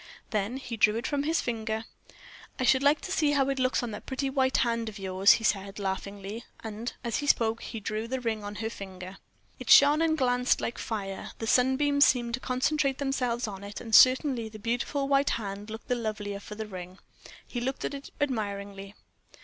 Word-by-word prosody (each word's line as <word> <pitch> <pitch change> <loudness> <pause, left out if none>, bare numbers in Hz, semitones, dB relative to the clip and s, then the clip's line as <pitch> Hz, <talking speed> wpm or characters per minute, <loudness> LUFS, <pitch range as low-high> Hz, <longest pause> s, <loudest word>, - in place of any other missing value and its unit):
Then 215 +4 -1
he 245 -3 -6
drew 210 0 +4
it 235 +2 -3
from 285 0 0
his 320 +3 +1
finger. 220 -1 -3 0.7
"I - - -1
should 260 +1 +4
like 285 +2 +3
to 370 - -6
see 300 -5 +2
how 275 -1 +2
it 270 -1 -1
looks 255 -1 +1
on 240 - -3
that 210 - -8
pretty 270 0 -2
white 265 -1 +2
hand 230 -1 0
of 210 - -10
yours," 190 0 +4
he 225 - -2
said, 200 -2 0
laughingly; 200 +2 -4 0.2
and, 220 +2 -5
as 235 -2 -1
he 290 - -3
spoke, 225 -3 +2
he 225 - -6
drew 215 +2 -3
the 260 +2 -2
ring 225 -3 -2
on 205 0 -6
her - - 0
finger. 190 -2 -9 0.4
It - - -7
shone 290 +2 +7
and 320 -1 +2
glanced 250 -2 +2
like 235 - -3
fire; 195 -4 -5
the 225 - -4
sunbeams 265 +4 +3
seemed 240 -2 +1
to 255 - -1
concentrate 270 +2 0
themselves 255 -4 -1
on 200 -1 -7
it; 205 +1 -7
and, 225 -2 -9
certainly, 255 -2 +5
the 215 - -10
beautiful 245 +6 -1
white 275 0 +3
hand 205 -1 -6
looked 220 +1 -8
the - - +1
lovelier 215 -4 -3
for 210 +1 -9
the 220 +1 -5
ring. 185 -2 -9 0.5
He 240 - -5
looked 265 +2 -2
at - - -3
it 280 0 -7
admiringly. 200 -6 -3
230 Hz, 205 wpm, -28 LUFS, 205-265 Hz, 0.7 s, shone